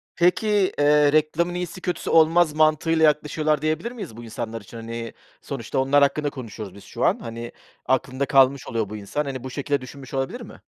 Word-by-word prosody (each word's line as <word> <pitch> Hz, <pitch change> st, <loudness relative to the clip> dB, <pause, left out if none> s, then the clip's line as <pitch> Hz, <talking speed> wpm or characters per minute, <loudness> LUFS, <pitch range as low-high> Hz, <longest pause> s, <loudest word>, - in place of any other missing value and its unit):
Peki, 180 Hz, +5 st, +2 dB, 0.3 s
eee, 145 Hz, 0 st, +5 dB
reklamın 155 Hz, +3 st, +2 dB
iyisi, 180 Hz, +1 st, -5 dB
kötüsü 180 Hz, -1 st, -3 dB
olmaz 165 Hz, 0 st, +5 dB
mantığıyla 155 Hz, +1 st, +3 dB
yaklaşıyorlar 150 Hz, 0 st, +1 dB
diyebilir 155 Hz, +9 st, -1 dB
miyiz 195 Hz, -, -8 dB
bu 120 Hz, -, -9 dB
insanlar 115 Hz, 0 st, -5 dB
için? 105 Hz, +4 st, -12 dB
Hani, 115 Hz, 0 st, -6 dB, 0.3 s
sonuçta -, -, -4 dB
onlar 135 Hz, +2 st, +3 dB
hakkında 145 Hz, +1 st, +1 dB
konuşuyoruz 110 Hz, -7 st, -8 dB
biz 100 Hz, -, -13 dB
şu -, -, -3 dB
an. -, -, +2 dB
Hani, 115 Hz, 0 st, -7 dB, 0.3 s
aklında 130 Hz, +1 st, 0 dB
kalmış 135 Hz, 0 st, +4 dB
oluyor 110 Hz, -3 st, -2 dB
bu 105 Hz, -, -6 dB
insan. 105 Hz, +9 st, -3 dB
Hani, 130 Hz, -3 st, -5 dB
bu 130 Hz, -, -5 dB
şekilde 140 Hz, +1 st, -2 dB
düşünmüş 135 Hz, +1 st, -11 dB
olabilir 135 Hz, 0 st, -2 dB
mi? -, -, -12 dB
140 Hz, 185 wpm, -23 LUFS, 120-155 Hz, 0.3 s, eee